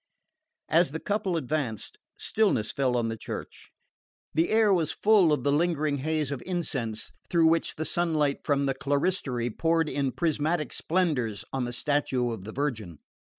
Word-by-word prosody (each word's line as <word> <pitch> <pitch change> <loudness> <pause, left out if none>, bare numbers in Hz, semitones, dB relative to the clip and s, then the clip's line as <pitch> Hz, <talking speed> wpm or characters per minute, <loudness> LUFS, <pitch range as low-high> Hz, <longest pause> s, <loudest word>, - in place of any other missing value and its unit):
As 170 +2 +4
the 160 +3 -5
couple 200 -3 -1
advanced, 135 -7 -3 0.2
stillness 200 - +1
fell 130 -3 +1
on 115 -1 0
the 115 - -3
church. - - -8 0.6
The 165 +3 +2
air 220 -2 +4
was 165 -5 +1
full 205 -6 +4
of 145 -5 +1
the 140 - +2
lingering 155 -2 +1
haze 155 0 -1
of 140 - -4
incense, 135 - -3 0.2
through 170 -2 +4
which 165 +1 +2
the 155 - -3
sunlight 155 -4 +1
from 140 -1 +1
the 135 - +1
clerestory 140 -3 -1
poured 165 +5 +1
in 140 -2 -1
prismatic 155 -1 0
splendours 140 - 0
on 130 -2 -1
the 120 - -4
statue 130 -2 0
of 100 -4 -6
the 110 - -6
Virgin. 110 - -3
145 Hz, 160 wpm, -27 LUFS, 125-165 Hz, 0.6 s, As